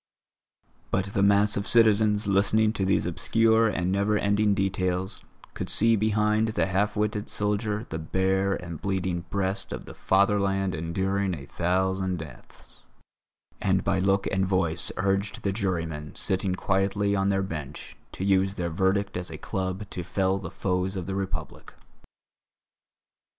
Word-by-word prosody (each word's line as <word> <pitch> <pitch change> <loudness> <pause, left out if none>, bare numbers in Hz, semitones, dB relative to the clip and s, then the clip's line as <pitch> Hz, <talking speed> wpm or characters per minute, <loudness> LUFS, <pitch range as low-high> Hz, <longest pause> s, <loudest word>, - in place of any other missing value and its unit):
But 95 +1 -1
the 100 - +1
mass 100 +1 +4
of 100 - -2
citizens 110 -2 +4
listening 105 +2 +3
to 95 - -1
these 95 - +2
obscure 115 +6 +3
and 90 -4 -1
never 100 +2 +2
ending 105 0 +2
details 95 0 -1 0.3
could - - -5
see 115 +1 +4
behind 105 +1 +2
the 110 - 0
half 100 +2 0
witted 105 0 -1
soldier 105 +1 -1
the 80 - -5
bare 95 +4 +1
and 85 -3 -7
bleeding 95 -3 -2
breast 95 0 -2
of - - -6
the - - -10
fatherland 95 -1 +1
enduring 95 +4 -1
a 70 -3 -9
thousand 95 +3 0
deaths; 75 -7 -13 0.7
and - - +2
by - - +1
look 95 +1 +2
and 95 -1 +1
voice 85 -3 0
urged 100 +2 -1
the 100 - +1
jurymen, 85 -7 -3
sitting 95 -1 -1
quietly 100 +1 0
on 95 0 +1
their 95 0 +1
bench, 75 -6 -7 0.2
to 95 - -4
use 95 0 +2
their 85 -3 -2
verdict 95 +4 0
as 90 0 -4
a - - -7
club 95 +2 -4
to 90 - -4
fell 95 +2 0
the 90 -4 -6
foes 90 +1 -2
of 90 -2 -4
the 95 - -4
Republic. 95 -5 -5
95 Hz, 150 wpm, -26 LUFS, 95-100 Hz, 0.7 s, mass